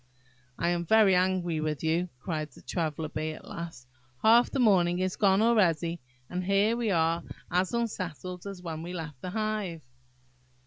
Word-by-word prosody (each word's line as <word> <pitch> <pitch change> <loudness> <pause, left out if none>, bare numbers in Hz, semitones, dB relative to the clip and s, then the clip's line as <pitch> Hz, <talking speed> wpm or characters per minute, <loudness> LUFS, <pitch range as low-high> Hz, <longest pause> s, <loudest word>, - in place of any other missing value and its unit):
"I 170 - +1
am 175 0 0
very 210 +2 +5
angry 180 -3 +1
with 155 -1 -2
you," 170 +3 +1
cried 155 -1 -3
the 130 - -17
Traveller 155 +2 -2
bee, 155 0 -3
at - - -12
last; 165 -7 -7 0.4
"half 230 +2 +6
the - - -3
morning 185 -8 +4
is 185 0 -1
gone 200 0 +3
already, 175 -7 +2 0.3
and 180 +1 -3
here 200 +4 +3
we 235 -2 -1
are 165 -2 +2 0.3
as 180 +1 +1
unsettled 185 -6 -4
as 195 -2 -8
when 160 -2 -5
we 175 +2 -6
left 155 -7 -6
the 185 - -4
hive!" 210 -5 -2
180 Hz, 170 wpm, -29 LUFS, 165-200 Hz, 0.4 s, half